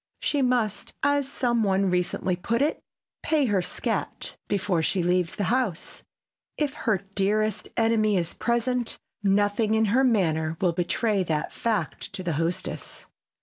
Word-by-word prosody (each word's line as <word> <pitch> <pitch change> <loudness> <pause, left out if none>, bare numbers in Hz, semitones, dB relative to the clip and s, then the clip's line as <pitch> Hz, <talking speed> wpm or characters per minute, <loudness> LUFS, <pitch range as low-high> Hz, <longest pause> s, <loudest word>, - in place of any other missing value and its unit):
She 290 - +1
must, 245 -5 0
as 285 -1 +2
some 240 -4 +1
one 195 -2 +2
recently 180 0 0
put 230 +8 0
it, 300 - -1 0.4
"pay 305 -3 +2
her 205 -5 +2
scat" - - -3
before 190 -4 0
she 180 +3 0
leaves 180 -1 +1
the 205 - -1
house. 240 -10 -2 0.6
If 295 -3 0
her 210 -5 0
dearest 210 +2 0
enemy 220 -3 +3
is 170 -1 -1
present 240 0 0 0.2
nothing 205 +2 +2
in 220 0 +3
her 260 +2 +4
manner 165 -9 +1
will 180 -3 +2
betray 195 +4 0
that 155 -2 -2
fact 215 -9 -2
to 185 - -5
the 175 -2 -1
hostess. 165 +4 -3
205 Hz, 145 wpm, -26 LUFS, 180-235 Hz, 0.6 s, her